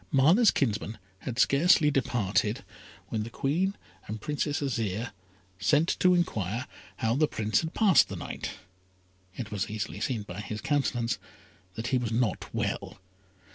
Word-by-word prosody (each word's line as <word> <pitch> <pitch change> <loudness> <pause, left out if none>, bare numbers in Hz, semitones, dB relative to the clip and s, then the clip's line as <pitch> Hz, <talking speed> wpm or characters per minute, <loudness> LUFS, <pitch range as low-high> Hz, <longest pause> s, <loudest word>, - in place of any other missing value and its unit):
Mana's 165 - +6
kinsman 110 -4 0 0.2
had 115 +3 -5
scarcely 150 +3 +5
departed, 115 -2 0 0.5
when 110 - -1
the 110 - -4
Queen 175 - 0 0.3
and 110 +1 -4
Princess 145 +3 -1
Azire 115 -5 -2 0.5
sent 150 - +3
to 180 0 +5
enquire 115 - -1 0.3
how 115 0 +1
the 155 +2 +3
Prince 110 -4 +1
had 160 0 -5
passed 205 -5 +5
the - - -5
night. - - -5 0.9
It 115 -4 -6
was 105 -1 -2
easily 105 0 -4
seen 115 -6 -1
by 95 0 -7
his 105 +1 -5
countenance 120 -6 0 0.6
that 115 +2 -3
he 130 -1 +2
was 120 -2 -2
not 115 -4 0
well. - - -3
120 Hz, 145 wpm, -29 LUFS, 110-145 Hz, 0.9 s, Mana's